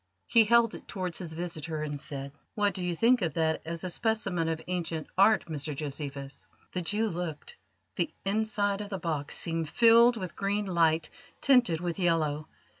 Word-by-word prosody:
He 230 -2 +5
held 235 +1 +4
it - - -10
towards 185 -4 -4
his 170 -4 -6
visitor, 160 -2 -4
and 145 -2 -5
said: 140 -2 -6 0.2
"What 205 -1 +1
do 185 - -3
you 175 -1 -1
think 235 +6 +4
of 165 -5 -1
that 160 -1 +1
as 165 +1 -5
a 185 - -2
specimen 200 -7 0
of 160 -1 -2
ancient 170 -3 -3
art, 205 +3 +4
Mr 150 -2 -4
Josephus?" 140 -1 -6 0.3
The 180 - -1
Jew 210 +6 +1
looked. 170 -5 -5 0.4
The 175 - 0
inside 205 0 0
of 205 - -6
the 195 - -3
box 155 -5 -2
seemed 165 -2 -1
filled 235 +2 +6
with 185 -4 -6
green 205 +1 -1
light 165 -4 +2 0.3
tinted 245 - +4
with 175 +1 -3
yellow. 155 -4 +1
175 Hz, 180 wpm, -29 LUFS, 160-205 Hz, 0.4 s, filled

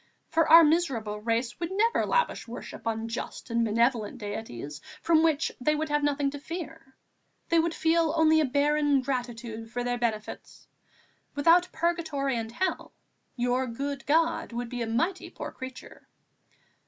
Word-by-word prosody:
For 325 -1 +2
our 330 +1 +10
miserable 265 -10 +1
race 230 +3 -1
would 340 -1 -2
never 440 +4 +2
lavish 485 - 0
worship 230 0 -8
on 225 0 -2
just 230 +1 -6
and 230 0 +2
benevolent 230 +1 +1
deities 205 - -6 0.2
from 325 -2 +3
which 320 -2 +2
they 300 +4 +2
would 310 +1 -2
have 295 0 +1
nothing 285 -1 +1
to 285 - -7
fear; 310 -4 -8 0.5
they 335 - +4
would 330 0 0
feel 325 -1 +2
only 315 0 +5
a - - +2
barren 290 +1 +2
gratitude 240 -3 -4
for 245 +1 -3
their 245 0 -1
benefits. 220 -3 -4 0.7
Without 340 +5 +4
purgatory 315 -5 -1
and 225 -1 -3
hell, 370 +10 -2 0.4
your 250 +1 0
good 275 +4 -5
God 325 -3 +1
would 240 0 -4
be 245 0 -4
a 230 - -1
mighty 330 +12 -1
poor - - -7
creature." 260 0 -10
275 Hz, 155 wpm, -28 LUFS, 235-320 Hz, 0.7 s, our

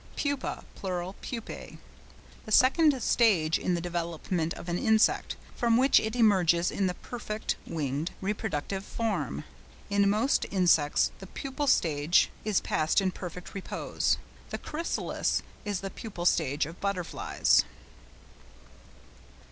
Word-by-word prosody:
PUPA 285 -2 -2
(pl. 185 -1 -3
PUPÆ).—The 230 -2 -10
second 270 +4 +5
stage 180 -10 +3
in 180 - 0
the - - -1
development 170 -1 -2
of - - -9
an 175 +1 -1
insect, 220 0 +3 0.2
from 230 -1 +3
which 265 +2 +5
it 220 +2 -3
emerges 180 -7 +4
in 195 - 0
the 180 - -2
perfect 220 -1 -4
(winged) 150 0 -2
reproductive 195 -2 -3
form. 185 - -2 0.5
In 200 0 +4
most 220 +7 +2
insects 175 -6 +3
the 190 - -9
pupal 275 +7 -4
stage 155 -2 +3
is 210 -3 +1
passed 155 +5 +1
in 190 -1 +1
perfect 180 -1 -8
repose. 195 - -1 0.3
The - - -3
chrysalis 325 +2 -2 0.2
is 205 -3 -2
the 195 0 -5
pupal 190 -6 -7
state 150 -4 +2
of 165 +3 -10
butterflies. 200 -3 +2
190 Hz, 125 wpm, -29 LUFS, 170-220 Hz, 0.5 s, second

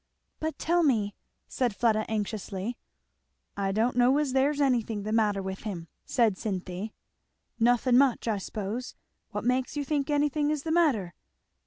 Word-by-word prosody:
"But 315 -2 -3
tell 345 +2 +2
me," 220 -10 +2 0.3
said 245 -5 -1
Fleda 215 -1 +2
anxiously. 210 0 -3 0.8
"I 195 -1 -1
don't 225 +5 +1
know 250 +3 +4
as 295 -3 0
there's 280 +2 +2
anything 235 -6 +1
the 215 - -3
matter 210 -3 +2
with 190 0 -4
him," 180 -6 -6 0.2
said 225 -6 +2
Cynthy. 190 0 -4 0.6
"Nothing 245 +2 +4
much, 270 -4 +2
I 215 -3 +1
suppose. 215 +5 -5 0.3
What - - -4
makes 255 +3 0
you 290 - -1
think 285 -1 -1
anything 295 0 +1
is 300 -2 -1
the 320 - -2
matter?" 270 - +2
235 Hz, 155 wpm, -28 LUFS, 205-275 Hz, 0.8 s, know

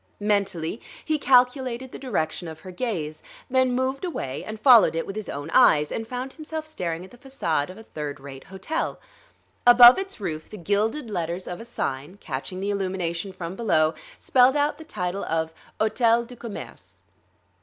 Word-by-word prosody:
Mentally 200 -2 -1 0.2
he 310 -1 0
calculated 250 -1 +2
the - - -8
direction 175 - -2
of 160 -1 -9
her 185 - -9
gaze, 175 -8 -3 0.3
then, 260 -1 +3
moved 260 +3 -1
away 140 - -4
and 215 0 -7
followed 235 -7 +7
it 165 - -1
with 195 - -7
his 215 -1 -5
own 145 +3 -5
eyes; 150 -13 +5
and 225 - -4
found 255 +2 -5
himself 315 0 -6
staring 180 - -4
at - - -16
the 245 - -16
façade 170 - -2
of 185 - -10
a 220 - -11
third 150 -8 -6
rate 135 -1 -10
hotel. 190 - -3 0.7
Above 245 +4 +10
its 385 -6 -5
roof 160 -6 -5
the 215 - -9
gilded 210 - 0
letters 175 -1 -3
of 180 +4 -6
a - - -9
sign, 150 - -4
catching 155 +2 -5
the 200 +1 -1
illumination 185 -2 -2
from 180 -1 -6
below, 160 -8 +2 0.2
spelled 260 0 +4
out 290 +1 +1
the - - -8
title 195 - -3
of 160 0 -1 0.3
"Hôtel 230 +1 +3
du 250 +1 -11
Commerce." 230 -3 -9
205 Hz, 175 wpm, -25 LUFS, 165-250 Hz, 0.7 s, Above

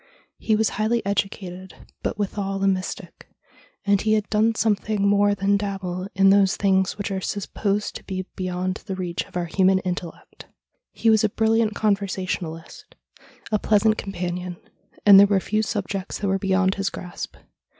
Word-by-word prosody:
He 220 - +1
was 220 0 +2
highly 230 +1 +1
educated, 190 -2 -3 0.3
but - - -3
withal 195 -1 -2
a - - +3
mystic, 185 -1 -3 0.6
and 200 -1 +3
he 215 0 +2
had 215 -1 +1
done 220 +1 +2
something 210 -2 0
more 205 0 +3
than 200 +1 +2
dabble 190 -2 -4
in 195 0 +5
those 195 -1 +4
things 190 -1 +1
which 205 0 -4
are 190 -1 -2
supposed 205 +1 -2
to - - -17
be 185 -1 -4
beyond 185 +1 -3
the 190 - -3
reach 180 -2 -3
of - - -7
our 175 - -1
human 190 +2 +3
intellect. 180 -2 -6 0.4
He 225 - +2
was 220 -1 +4
a 215 - +3
brilliant 220 0 +1
conver 200 -2 +1
sationalist, 170 -3 -5 0.6
a 215 - +2
pleasant 215 +1 +3
companion, 180 -2 -4 0.5
and 200 -2 +10
there 200 - +8
were 200 -1 +2
few 215 +3 0
subjects 200 -3 -3
that 205 - -2
were 195 0 +1
beyond 190 0 +2
his 195 0 -1
grasp. 180 -2 -7
195 Hz, 170 wpm, -23 LUFS, 185-210 Hz, 0.6 s, and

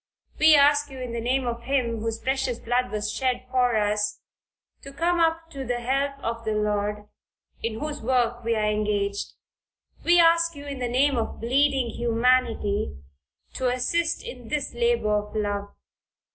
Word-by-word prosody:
We 310 0 +7
ask 290 0 +4
you 270 - -10
in 250 -2 -5
the 235 - -3
name 255 +2 0
of 235 -1 -3
Him 240 -3 -1
whose 225 0 -2
precious 265 -1 -1
blood 245 +2 0
was 210 0 -2
shed 255 +2 -1
for 250 -3 +2
us, 210 0 0 0.6
to 275 - -10
come 340 +5 0
up 330 0 +1
to 275 -3 -5
the 245 -1 -2
help 275 +3 -1
of 230 0 -3
the 220 -1 -1
Lord, 210 0 -1 0.5
in 225 -1 -3
whose 300 -1 -4
work 240 0 0
we 230 0 +1
are 215 -1 +1
engaged. 205 -1 -1 0.7
We 345 +1 +5
ask 335 0 +4
you, 285 0 -9
in 280 -2 -6
the 245 -1 -2
name 270 +2 +2
of 225 - -4
bleeding 265 0 +2
humanity, 230 - +1 0.6
to 260 - -1
assist 325 +7 0
in 245 -3 -9
this 295 +3 -2
labor 235 -3 +1
of 210 0 -3
love. 205 -1 -1
245 Hz, 170 wpm, -25 LUFS, 220-275 Hz, 0.7 s, We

